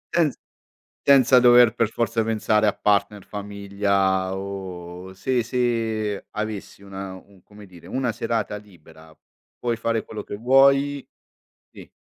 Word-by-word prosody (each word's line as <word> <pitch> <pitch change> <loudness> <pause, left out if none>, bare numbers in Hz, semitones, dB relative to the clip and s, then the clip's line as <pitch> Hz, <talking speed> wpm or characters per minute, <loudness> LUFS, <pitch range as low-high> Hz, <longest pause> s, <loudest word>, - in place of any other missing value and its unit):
Senz 160 -6 +2 0.6
senza 130 -2 +6
dover 120 -2 +7
per 115 -3 +1
forza 115 -1 -1
pensare 110 -1 +1
a 105 - +2
partner, 100 -1 0
famiglia 100 -2 -1
o 95 -2 -7
se 120 +5 -1
se 115 -4 -1
avessi 105 -2 -5
una 95 -1 -7
un 95 0 -17
come 105 0 -15
dire, 90 -3 -15
una 130 -3 -1
serata 115 -1 -2
libera, 80 -6 -15 0.4
puoi 120 -1 -1
fare 115 0 -1
quello 110 - -7
che - - -7
vuoi? 135 +3 +3 0.6
Sì. - - -13
105 Hz, 130 wpm, -23 LUFS, 100-120 Hz, 0.6 s, dover